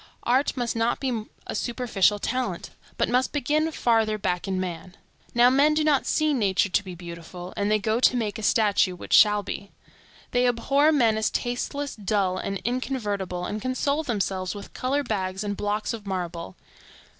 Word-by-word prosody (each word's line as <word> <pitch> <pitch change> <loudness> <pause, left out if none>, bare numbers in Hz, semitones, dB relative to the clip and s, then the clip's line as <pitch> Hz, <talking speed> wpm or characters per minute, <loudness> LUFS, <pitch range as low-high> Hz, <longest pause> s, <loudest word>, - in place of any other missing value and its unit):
Art 260 +3 +1
must 240 -2 -1
not 230 +1 +1
be 240 -5 -2 0.2
a - - -5
superficial 230 -5 +1
talent, 255 +5 -3 0.3
but - - +2
must 255 +1 +1
begin 300 +3 0
farther 225 -6 +2
back 180 -3 -2
in 190 -1 -1
man. 180 0 -5 0.4
Now 240 +1 +6
men 290 +3 +4
do 310 - +2
not 295 -3 +2
see 310 -1 +2
nature 200 -5 +2
to 200 - +1
be 185 -2 -8
beautiful, 175 +1 -9
and 205 0 0
they 215 - +4
go 215 +2 0
to 250 0 +4
make 215 -3 -2
a - - -5
statue 205 -3 +2
which - - -6
shall 210 -1 +6
be. 200 0 -6 0.6
They 250 0 +3
abhor 275 +6 +3
men 230 -7 +3
as 220 - +1
tasteless, 280 +4 -3
dull, 195 -3 0
and 195 - -3
inconvertible, 210 -8 -2
and 210 +3 -4
console 280 +4 0
themselves 195 - -2
with 200 - -9
color 275 +3 -1
bags 190 -4 -2
and 205 -1 -2
blocks 210 +3 -2
of 215 -3 -8
marble. 175 - -4
215 Hz, 180 wpm, -25 LUFS, 195-255 Hz, 0.6 s, Now